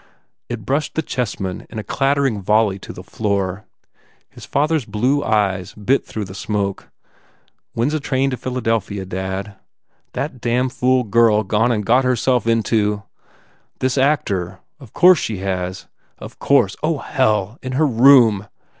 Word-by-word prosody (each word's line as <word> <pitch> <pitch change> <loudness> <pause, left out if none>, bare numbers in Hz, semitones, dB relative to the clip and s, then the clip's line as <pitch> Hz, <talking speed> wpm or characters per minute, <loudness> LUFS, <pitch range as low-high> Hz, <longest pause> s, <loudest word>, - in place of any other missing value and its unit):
It 115 -4 -5
brushed 145 +5 -1
the 160 - 0
chessmen 100 -9 -4
in 115 - -9
a 110 - -3
clattering 135 -4 0
volley 105 0 +2
to - - -9
the - - -10
floor. 100 -2 -2 0.7
His - - -12
father 150 +3 +1
s 145 - -4
blue 130 +7 0
eyes 95 -6 0
bit 120 +6 +1
through 110 -2 -4
the 95 - -10
smoke. 100 0 -3 0.8
"When 115 +4 0
s - - -4
a 155 - 0
train 135 -1 0
to 130 - -3
Philadelphia, 115 -6 -2
dad?" 95 +2 -5 0.6
"That 135 -4 -4
damn 125 +2 +1
fool 125 0 +1
girl 110 -1 +3
gone 110 +4 +1
and 105 -3 -1
got 125 +5 +4
herself 125 -1 +1
into" 105 -2 +1 0.7
"This 130 0 0
actor!... 100 - 0 0.2
Of 130 -7 -14
course 180 -2 +6
she 110 - -3
has! 95 -1 -3 0.3
Of - - -11
course! - - +2
Oh, - - 0
hell! 105 +1 0
In 130 0 -5
her 150 +4 +2
room! 120 -5 +5
115 Hz, 155 wpm, -19 LUFS, 100-130 Hz, 0.8 s, course